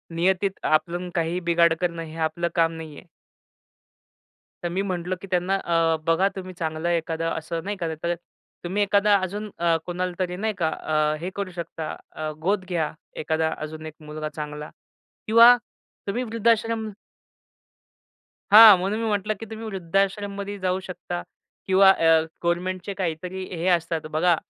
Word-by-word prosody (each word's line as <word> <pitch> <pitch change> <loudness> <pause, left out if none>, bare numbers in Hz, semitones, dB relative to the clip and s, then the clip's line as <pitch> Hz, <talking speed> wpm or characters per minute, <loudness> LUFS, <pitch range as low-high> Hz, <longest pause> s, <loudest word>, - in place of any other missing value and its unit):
नियतीत 190 +3 +1
आपलं 175 +3 0
काहीही 170 +1 0
बिघाड 170 -1 +3
करणं 170 -2 -1
हे 160 0 -10
आपलं 170 +1 -2
काम 165 -1 +3
नाहीये. 155 -3 -9 1.6
तर - - 0
मी 190 +3 -1
म्हटलं 185 -1 -3
की - - -9
त्यांना 180 +1 +1
अ, 165 -3 +1
बघा 175 +4 +3
तुम्ही 185 -1 -7
चांगलं 160 +1 -2
एखादं 165 -1 -1
असं 165 +1 -5
नाही 205 +1 -3
का 170 -3 -3
तर, 170 0 0 0.5
तुम्ही 190 +4 0
एखादा 205 0 +4
अजून 205 +3 -4
अ, 170 -1 +3
कोणाला 180 +1 -2
तरी. 180 -1 -2
नाही 215 +3 -1
का? 165 -3 +2
अ, 155 -1 0
हे 180 - -4
करू 200 -2 -3
शकता 165 -2 -5 0.2
अ, 155 0 -3
गोद 190 +1 +1
घ्या 165 -4 -1 0.3
एखादा 160 0 0
अजून 155 +1 -7
एक 155 - -8
मुलगा 155 0 -5
चांगला 150 0 -6 0.6
किंवा 230 +3 +8 0.5
तुम्ही 220 +5 -1
वृद्धाश्रम 230 -1 +1 1.6
हां, 215 -2 +11
म्हणून 195 +4 -1
मी 230 - -1
म्हटलं, 210 +1 0
की 225 - -6
तुम्ही 220 0 -7
वृद्धाश्रममध्ये 200 +1 -2
जाऊ 185 0 -1
शकता 175 -1 -6 0.4
किंवा 190 0 +6
अ, 190 - +2 0.4
गव्हर्नमेंटचे 185 +3 -2
काहीतरी 180 +1 -3
हे 170 +1 -3
असतात 165 -3 +1
बघा 165 +2 +3
180 Hz, 150 wpm, -24 LUFS, 165-195 Hz, 1.6 s, हां